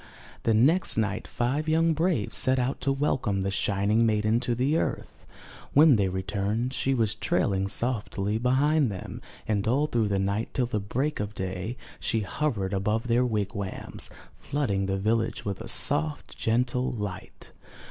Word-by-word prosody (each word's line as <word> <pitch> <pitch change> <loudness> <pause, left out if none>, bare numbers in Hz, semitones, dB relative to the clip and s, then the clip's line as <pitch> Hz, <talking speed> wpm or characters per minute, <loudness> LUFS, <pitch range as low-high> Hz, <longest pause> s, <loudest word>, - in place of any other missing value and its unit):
The 115 - +2
next 150 +10 +3
night 105 0 -1
five 140 +6 -1
young 165 +1 +3
braves 160 - 0
set 130 0 +2
out 130 +1 -1
to 140 - +1
welcome 130 -8 0
the 100 +1 -1
shining 100 +3 +1
maiden 110 0 +2
to 120 -1 -1
the 135 +6 +1
earth. - - -4 0.5
When 150 -1 +7
they 100 -3 +2
returned, 100 +6 -2
she 135 +1 0
was 110 -4 +1
trailing 100 - 0
softly 105 -2 -1
behind 135 +3 +3
them, 95 - -7 0.3
and 105 -1 0
all 135 +6 +3
through 120 -7 0
the 100 -1 0
night 100 +3 -1
till 125 - +2
the 110 -3 -2
break 130 +9 -2
of 105 0 -4
day, 95 +5 -4 0.2
she 110 - 0
hovered 105 -3 -2
above 105 +5 -1
their 120 +2 +4
wigwams, 100 -3 -3 0.3
flooding 100 -10 -1
the 95 0 0
village 110 +3 0
with 100 -2 -3
a - - -7
soft, 75 0 +1
gentle 125 +2 0
light. 105 -6 -6
110 Hz, 160 wpm, -27 LUFS, 100-130 Hz, 0.5 s, When